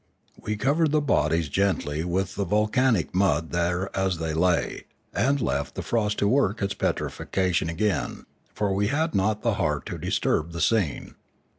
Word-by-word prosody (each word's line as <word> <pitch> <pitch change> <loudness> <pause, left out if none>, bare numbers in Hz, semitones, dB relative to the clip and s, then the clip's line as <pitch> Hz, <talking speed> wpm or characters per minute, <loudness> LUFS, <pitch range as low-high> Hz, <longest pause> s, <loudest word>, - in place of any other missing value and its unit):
We 105 - -4
covered 150 +7 +2
the 155 +1 +3
bodies 85 - +1
gently 80 -4 0
with 90 +2 -1
the 100 - -2
volcanic 105 +2 +1
mud 85 -4 +1
there 85 +2 -1
as 95 -2 0
they 80 -1 -2
lay, 85 +1 0 0.3
and 140 +4 +2
left 70 - -2
the - - -4
frost 105 -3 0
to 100 - +2
work 115 -3 +2
its 100 -1 -1
petrifaction 90 -3 -1
again, 95 +2 -1 0.3
for 105 -2 0
we 100 +1 +1
had 160 +6 0
not 105 +2 +1
the 115 -3 +2
heart 75 -2 0
to - - -5
disturb 85 +2 0
the 85 - -4
scene. 90 - 0
95 Hz, 165 wpm, -25 LUFS, 85-110 Hz, 0.3 s, the